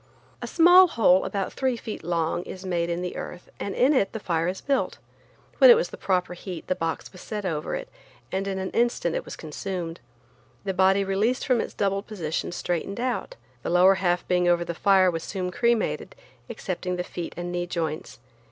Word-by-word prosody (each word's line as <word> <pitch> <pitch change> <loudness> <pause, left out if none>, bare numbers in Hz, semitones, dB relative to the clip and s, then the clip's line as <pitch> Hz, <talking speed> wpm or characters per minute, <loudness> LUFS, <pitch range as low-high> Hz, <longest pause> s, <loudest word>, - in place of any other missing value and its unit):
A - - -4
small 355 +2 +7
hole 200 - +4
about 195 -2 -3
three 260 -2 0
feet 220 - -7
long 170 0 0
is 185 +1 -9
made 170 -2 -1
in 170 +1 -2
the 180 - -4
earth 180 - -8
and 200 - -4
in 265 +4 +4
it 200 -8 +1
the 220 - -4
fire 170 -4 0
is 185 +1 -2
built. 275 -1 -1 0.6
When - - +9
it 480 - +11
was 470 - 0
the - - -8
proper 180 -2 0
heat 180 -1 -7
the - - +1
box 165 -2 -3
was 185 - -13
set 210 -2 -5
over 155 -4 -2
it, - - -5 0.4
and 195 +1 -1
in 195 -1 -2
an 190 0 -3
instant 235 -8 +1
it - - -3
was - - -7
consumed. 170 +1 -5 0.6
The 195 -1 -2
body 190 +1 +4
released 205 +6 0
from 250 -3 +3
its - - -6
doubled 195 0 -1
position 170 -8 -3
straightened 175 +4 -3
out. 255 - -2 0.3
The - - -4
lower 180 +2 +6
half 175 -1 +1
being 180 -1 +2
over 175 0 +3
the 170 - -3
fire 190 +1 +4
was 165 -1 -3
soon 180 +1 -4
cremated, 235 +3 0 0.3
excepting 180 -1 -3
the 180 - -2
feet 175 -1 -6
and 175 0 -4
knee 175 0 -2
joints. 160 -3 -3
185 Hz, 205 wpm, -25 LUFS, 175-205 Hz, 0.6 s, it